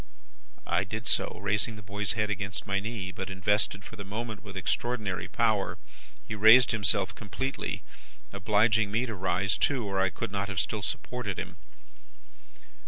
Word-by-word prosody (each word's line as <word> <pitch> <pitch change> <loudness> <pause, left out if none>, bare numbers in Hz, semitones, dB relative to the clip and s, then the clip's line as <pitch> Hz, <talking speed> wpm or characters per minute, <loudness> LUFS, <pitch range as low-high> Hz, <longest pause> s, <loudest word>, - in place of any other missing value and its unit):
"I - - +2
did 110 +4 -5
so, - - +1
raising 105 +2 +1
the 105 - -10
boy's 100 0 -1
head 105 -2 0
against 100 0 -3
my 100 -1 +1
knee. 100 -3 -4
But, 95 +2 -5
invested 100 +2 +1
for 115 - -10
the 100 - -5
moment 110 +2 -5
with 100 -3 -8
extraordinary 95 -2 -1
power, 110 -4 +1 0.5
he - - -4
raised 110 +3 +7
himself 105 -3 +2
completely: 130 +7 -4 0.5
obliging 105 +2 +3
me 115 +4 +1
to 115 - -4
rise 95 0 0
too, 130 -6 +2
or 95 -1 -1
I 95 - +3
could 105 +3 -5
not 100 0 -2
have 95 -3 -1
still 105 +3 -1
supported 105 -1 -3
him. - - -6
105 Hz, 165 wpm, -29 LUFS, 100-110 Hz, 0.5 s, raised